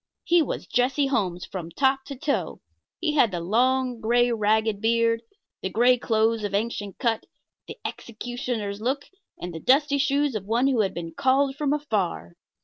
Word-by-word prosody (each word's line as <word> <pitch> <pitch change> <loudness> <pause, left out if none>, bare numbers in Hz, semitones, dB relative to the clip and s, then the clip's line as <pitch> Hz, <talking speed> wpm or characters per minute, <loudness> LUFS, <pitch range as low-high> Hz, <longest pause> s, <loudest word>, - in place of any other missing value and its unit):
He 345 0 +4
was 300 - -3
Jesse 265 +4 +1
Holmes 190 -10 -1
from 175 -3 -6
top 265 - +1
to 280 - -7
toe; 285 +2 -2 0.4
he 320 -3 0
had 275 -6 +4
the 180 -3 -3
long, 250 +6 +1
gray, 240 +2 +3
ragged 215 -1 +1
beard, 230 0 +2 0.4
the 190 - -2
gray 240 +6 +4
clothes 225 -2 +1
of 200 -1 -2
ancient 205 -2 -2
cut, 230 -4 -1 0.4
the 445 - -8
executioner's 235 -3 -4
look, 270 +5 -1 0.3
and 175 0 -6
the 165 - -6
dusty 280 - +3
shoes 280 0 +1
of 210 -3 -4
one 230 +5 +1
who 260 -5 +3
had 195 - -1
been 165 -1 -5
called 270 0 +2
from 285 -1 -1
afar. 195 - -2
235 Hz, 170 wpm, -25 LUFS, 210-270 Hz, 0.4 s, He